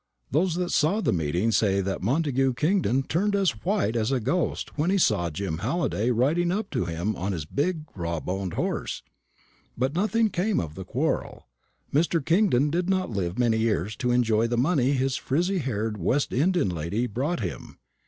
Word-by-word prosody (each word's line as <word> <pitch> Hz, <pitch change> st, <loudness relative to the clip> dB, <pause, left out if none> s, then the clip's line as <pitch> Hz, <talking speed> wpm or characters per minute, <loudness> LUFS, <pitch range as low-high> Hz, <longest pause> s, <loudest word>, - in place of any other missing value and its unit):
Those 165 Hz, +5 st, +2 dB
that 180 Hz, 0 st, -2 dB
saw 170 Hz, +9 st, +2 dB
the -, -, +1 dB
meeting 85 Hz, +6 st, 0 dB
say 100 Hz, -3 st, +2 dB
that 95 Hz, 0 st, -2 dB
Montagu 135 Hz, -, +1 dB
Kingdon 150 Hz, -, +1 dB
turned 200 Hz, +9 st, 0 dB
as 185 Hz, -, 0 dB
white 110 Hz, +3 st, 0 dB
as 115 Hz, +2 st, 0 dB
a 135 Hz, -, +2 dB
ghost 165 Hz, +8 st, -1 dB
when 155 Hz, +4 st, 0 dB
he 195 Hz, -, +3 dB
saw 85 Hz, -, +2 dB
Jim 80 Hz, 0 st, -4 dB
Halliday 120 Hz, -, 0 dB
riding 150 Hz, +9 st, +2 dB
up 200 Hz, +2 st, -2 dB
to -, -, -1 dB
him 85 Hz, +5 st, -2 dB
on 95 Hz, +3 st, -2 dB
his 80 Hz, -4 st, -4 dB
big, 155 Hz, -, -1 dB
raw 85 Hz, -3 st, -2 dB
boned 95 Hz, +1 st, -4 dB
horse; -, -, -2 dB, 0.7 s
but 130 Hz, +3 st, 0 dB
nothing 215 Hz, +4 st, +1 dB
came 195 Hz, +4 st, 0 dB
of 75 Hz, -3 st, -4 dB
the 95 Hz, +2 st, -8 dB
quarrel. -, -, -2 dB, 0.5 s
Mr. 165 Hz, +3 st, +2 dB
Kingdon 165 Hz, -, +3 dB
did 175 Hz, +3 st, 0 dB
not 185 Hz, -7 st, 0 dB
live 95 Hz, -3 st, -2 dB
many 115 Hz, -2 st, +2 dB
years 105 Hz, -2 st, 0 dB
to 125 Hz, -, -1 dB
enjoy 115 Hz, -2 st, +2 dB
the 120 Hz, 0 st, -1 dB
money 135 Hz, 0 st, +2 dB
his 135 Hz, 0 st, 0 dB
frizzy 180 Hz, +9 st, 0 dB
haired 110 Hz, -6 st, -2 dB
West 130 Hz, -, 0 dB
Indian 165 Hz, -, +2 dB
lady 90 Hz, +8 st, -2 dB
brought 135 Hz, +9 st, -2 dB
him. 90 Hz, -, -6 dB
125 Hz, 185 wpm, -26 LUFS, -, 0.7 s, he